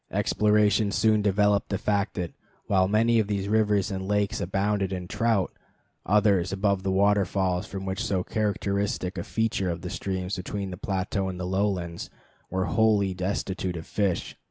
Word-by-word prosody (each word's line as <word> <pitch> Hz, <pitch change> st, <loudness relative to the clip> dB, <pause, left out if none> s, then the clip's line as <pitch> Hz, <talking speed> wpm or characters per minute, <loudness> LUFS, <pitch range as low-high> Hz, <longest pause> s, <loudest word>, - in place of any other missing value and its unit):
Exploration 105 Hz, 0 st, +2 dB
soon 110 Hz, 0 st, +3 dB
developed 105 Hz, 0 st, +2 dB
the 100 Hz, -, 0 dB
fact 105 Hz, 0 st, 0 dB
that, 90 Hz, -3 st, -3 dB, 0.3 s
while 95 Hz, -2 st, +3 dB
many 115 Hz, +3 st, +3 dB
of 110 Hz, -, +1 dB
these 100 Hz, -1 st, -2 dB
rivers 105 Hz, -2 st, +2 dB
and 95 Hz, 0 st, -4 dB
lakes 105 Hz, 0 st, 0 dB
abounded 100 Hz, +1 st, 0 dB
in 90 Hz, -2 st, -4 dB
trout, 110 Hz, -1 st, +1 dB, 0.6 s
others, 100 Hz, -3 st, +3 dB
above 100 Hz, 0 st, +1 dB
the 95 Hz, -, -2 dB
waterfalls 95 Hz, -2 st, +1 dB
which 95 Hz, 0 st, -5 dB, 0.2 s
form -, -, -1 dB
so 95 Hz, -2 st, 0 dB
characteristic 100 Hz, -3 st, -1 dB
a 85 Hz, -, -3 dB
feature 110 Hz, -4 st, -1 dB
of 85 Hz, 0 st, -3 dB
the 90 Hz, -, -5 dB
streams 95 Hz, 0 st, -3 dB
between 95 Hz, +1 st, -4 dB
the -, -, -5 dB
plateau 95 Hz, +1 st, -2 dB
and 90 Hz, -1 st, -6 dB
the 90 Hz, -, -3 dB
lowlands, 95 Hz, -3 st, -1 dB, 0.4 s
were 95 Hz, 0 st, -1 dB
wholly 105 Hz, -4 st, +2 dB
destitute 90 Hz, -1 st, -2 dB
of 80 Hz, -, -7 dB
fish. 100 Hz, -5 st, -1 dB
100 Hz, 165 wpm, -26 LUFS, 95-105 Hz, 0.6 s, soon